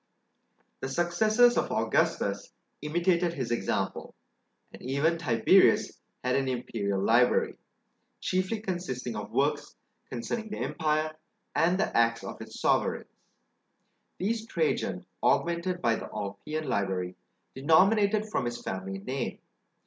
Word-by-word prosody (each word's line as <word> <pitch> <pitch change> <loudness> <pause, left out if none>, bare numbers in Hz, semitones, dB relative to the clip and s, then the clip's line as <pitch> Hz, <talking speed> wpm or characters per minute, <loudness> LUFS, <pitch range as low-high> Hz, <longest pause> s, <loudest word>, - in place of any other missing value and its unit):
The 135 - -4
successors 215 - +3
of - - 0
Augustus - - 0 0.3
imitated 170 +2 +1
his 125 -4 -3
example, 120 - -2 0.6
and - - -12
even 145 +6 +1
Tiberius 115 -9 +4 0.2
had 125 0 +1
an 135 -1 +1
imperial 110 -6 -2
library, 120 +2 +3 0.6
chiefly 185 +4 -1
consisting 160 - -4
of 105 - -5
works 145 +1 0 0.3
concerning 220 - -4
the 210 - -5
empire 155 -1 -1 0.4
and 180 +3 +2
the 215 - 0
acts 115 0 +3
of - - -7
its - - -9
sovereigns. - - 0 1.0
These 225 +4 -2
Trajan 470 - -1 0.2
augmented 170 +1 +1
by 115 -1 +3
the - - -7
Ulpian 130 +11 -4
library, 95 -2 -1 0.4
denominated 200 +9 +4
from 210 - -1
his 120 0 -3
family 95 +1 -4
name. 125 +6 -4
150 Hz, 120 wpm, -29 LUFS, 120-185 Hz, 1.0 s, Tiberius